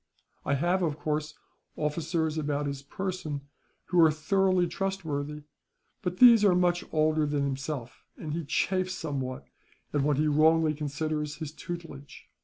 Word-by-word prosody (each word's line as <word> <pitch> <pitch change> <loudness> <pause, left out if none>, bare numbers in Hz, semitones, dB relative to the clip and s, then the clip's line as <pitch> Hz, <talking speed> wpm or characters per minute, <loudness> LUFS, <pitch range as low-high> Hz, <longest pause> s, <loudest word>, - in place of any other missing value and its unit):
I 140 - +2
have 175 +6 +1
of 155 -4 0
course, 150 -1 -2 0.4
officers 155 +1 -1
about 145 -2 -1
his 140 -1 -4
person 175 -2 -4 0.5
who 175 -1 +4
are 160 - +7
thoroughly 185 +3 +2
trustworthy; 160 -5 -3 0.6
but 180 -3 -3
these 235 -2 +8
are 195 -3 +5
much 175 -1 +2
older 155 -1 +2
than 145 -1 0
himself, 135 -2 -4
and 150 -2 -5
he 165 +1 -2
chafes 185 +5 0
somewhat 135 -6 -4 0.5
at 145 - +2
what 145 0 +2
he 155 - +2
wrongly 155 +1 +4
considers 150 0 -3
his 155 -2 -6
tutelage. 160 -5 -8
155 Hz, 145 wpm, -28 LUFS, 145-175 Hz, 0.6 s, these